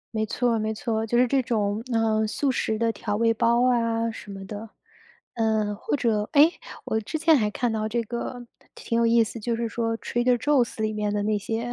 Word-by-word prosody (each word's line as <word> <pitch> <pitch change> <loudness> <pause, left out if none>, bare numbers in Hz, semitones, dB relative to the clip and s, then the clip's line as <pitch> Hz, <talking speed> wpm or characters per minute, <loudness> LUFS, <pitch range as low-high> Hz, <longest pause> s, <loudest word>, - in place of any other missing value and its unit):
没 220 0 +1
错 235 +1 0
没 215 0 -1
错， 220 0 -2
就 240 +2 0
是 250 - +5
这 265 +2 +2
种， 215 -3 -1
呃， 220 -1 +2
素 270 +6 0
食 220 -4 -1
的 230 +1 +1
调 205 0 -3
味 230 +1 +2
包 235 +2 +2
啊 230 -1 0
什 215 - -11
么 195 -1 -8
的， 210 +3 -7 0.7
嗯， 220 -2 +1
或 - - -2
者 220 -5 0
哎， 300 +3 +7 0.3
我 220 - -1
之 270 +9 -4
前 325 +1 +4
还 210 -4 +1
看 240 +1 -1
到 215 -1 -1
这 230 +1 -1
个 240 +2 -5 0.3
挺 230 0 -2
有 235 - +3
意 230 0 +5
思， 225 +1 -6
就 230 +2 -1
是 230 0 -2
说 225 0 -2
Trader 245 +1 +1
Joe's 250 -2 +1
里 215 0 0
面 210 -1 -2
的 205 -1 -1
那 210 0 +1
些， 225 +4 -3
225 Hz, 270 characters per minute, -25 LUFS, 215-240 Hz, 0.7 s, 哎